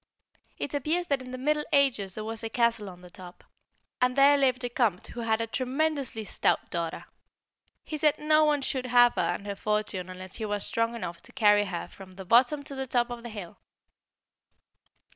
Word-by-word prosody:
It 285 - -4
appears 310 +5 0
that 280 -2 +1
in 255 - -9
the 255 - -6
Middle 300 +3 +1
Ages 255 -10 +2
there 215 - -5
was 225 0 -5
a 225 - -3
castle 235 -3 +1
on 180 -1 -13
the 180 -1 -14
top, 180 -1 -12 0.6
and 250 0 +2
there 280 +1 +6
lived 260 -2 +2
a 245 - -1
Comte 230 -7 0
who 240 - -8
had 225 -1 0
a 230 - 0
tremendously 265 0 -1
stout 200 - 0
daughter. 170 -1 -3 0.8
He 310 - -5
said 300 0 +3
no 305 +1 +3
one 295 -2 +2
should 260 -1 -2
have 245 0 +6
her - - 0
and 200 - -2
her 200 - -3
fortune 210 -3 -2
unless 185 0 -8
he 220 - -3
was 205 -1 -2
strong 230 +1 -1
enough 175 -7 -6
to - - -11
carry 205 -4 +4
her 175 -3 -5
from 185 -1 -14
the 190 0 -9
bottom 255 +8 +4
to 280 - -7
the 265 -1 -4
top 245 -1 +1
of 240 -1 -6
the 235 - -8
hill. 205 -6 -9
235 Hz, 205 wpm, -28 LUFS, 205-275 Hz, 0.8 s, there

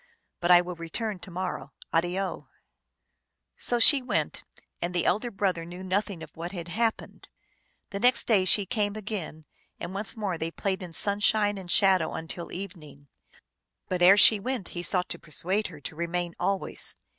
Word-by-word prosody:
But 175 - -1
I 175 -1 +8
will 180 0 -5
return 180 +5 -4
to 210 - -9
morrow. 185 +1 -5 0.2
Addio 175 +4 -1 0.4
/ - - -53
" - - -58 0.3
So 240 - -1
she 275 +4 +7
went, 250 - -2 0.4
and 175 +1 -3
the 175 - +1
elder 215 +6 +1
brother 195 -5 -1
knew 175 +2 -9
nothing 190 -2 -2
of 155 - -13
what 170 +3 -6
had 175 -2 -6
happened. 225 +3 -2 0.6
The 200 - -3
next 250 +3 +4
day 205 -6 +3
she 200 +2 +4
came 205 -1 -1
again, 190 -7 -6 0.3
and 175 +2 -6
once 205 +3 -2
more 195 -6 -2
they 165 - -2
played 190 +2 -2
in 180 -2 -7
sunshine 205 +3 +1
and 180 -2 -10
shadow 190 0 +4
until 165 +1 -5
evening; 155 -7 -9 0.8
but 180 -1 -1
ere 190 +3 +8
she 210 0 +8
went 250 -2 -4
he 175 - -5
sought 180 0 0
to - - -5
persuade 185 +7 0
her 155 -5 -11
to 150 - -8
remain 170 +1 -2
always. 195 -1 -1
185 Hz, 180 wpm, -27 LUFS, 175-205 Hz, 0.8 s, I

